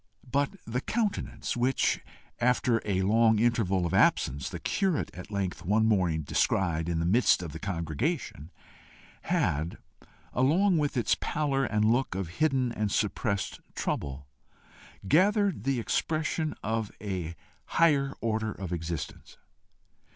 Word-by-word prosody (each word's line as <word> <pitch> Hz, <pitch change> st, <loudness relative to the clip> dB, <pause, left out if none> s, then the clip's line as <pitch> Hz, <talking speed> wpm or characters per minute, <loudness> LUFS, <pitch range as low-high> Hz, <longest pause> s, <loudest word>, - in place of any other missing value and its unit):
But 145 Hz, +7 st, +1 dB
the 125 Hz, +3 st, -2 dB
countenance 220 Hz, +2 st, -2 dB
which, 125 Hz, +2 st, +1 dB, 0.4 s
after 120 Hz, -1 st, +2 dB
a 95 Hz, -2 st, 0 dB
long 110 Hz, +2 st, +4 dB
interval 105 Hz, -5 st, +2 dB
of 85 Hz, -, -2 dB
absence, 70 Hz, +1 st, +2 dB
the -, -, -5 dB
curate 190 Hz, -6 st, 0 dB
at 90 Hz, -, -9 dB
length 100 Hz, -3 st, -3 dB
one 105 Hz, +5 st, +2 dB
morning 90 Hz, -8 st, +2 dB
descried 85 Hz, +1 st, +1 dB
in 85 Hz, -, 0 dB
the 80 Hz, -, 0 dB
midst 100 Hz, 0 st, +4 dB
of 85 Hz, -, -6 dB
the 80 Hz, -, -7 dB
congregation, 85 Hz, -, -3 dB, 0.8 s
had, 80 Hz, +4 st, 0 dB, 0.6 s
along 165 Hz, +8 st, +3 dB
with 145 Hz, -3 st, -1 dB
its 120 Hz, -, +2 dB
pallor 140 Hz, -3 st, 0 dB
and 105 Hz, -2 st, +1 dB
look 125 Hz, -3 st, 0 dB
of 95 Hz, -3 st, -3 dB
hidden 135 Hz, -5 st, +2 dB
and 105 Hz, -3 st, -2 dB
suppressed 100 Hz, -1 st, -1 dB, 0.2 s
trouble, 70 Hz, 0 st, -3 dB, 0.8 s
gathered 195 Hz, -, +3 dB
the 135 Hz, -2 st, +1 dB
expression 155 Hz, +5 st, -1 dB
of 110 Hz, -1 st, -1 dB
a 90 Hz, -5 st, -4 dB, 0.3 s
higher 140 Hz, -5 st, +3 dB
order 110 Hz, -1 st, -1 dB
of 95 Hz, -4 st, -5 dB
existence. 85 Hz, -2 st, -5 dB
110 Hz, 130 wpm, -29 LUFS, 90-135 Hz, 0.8 s, long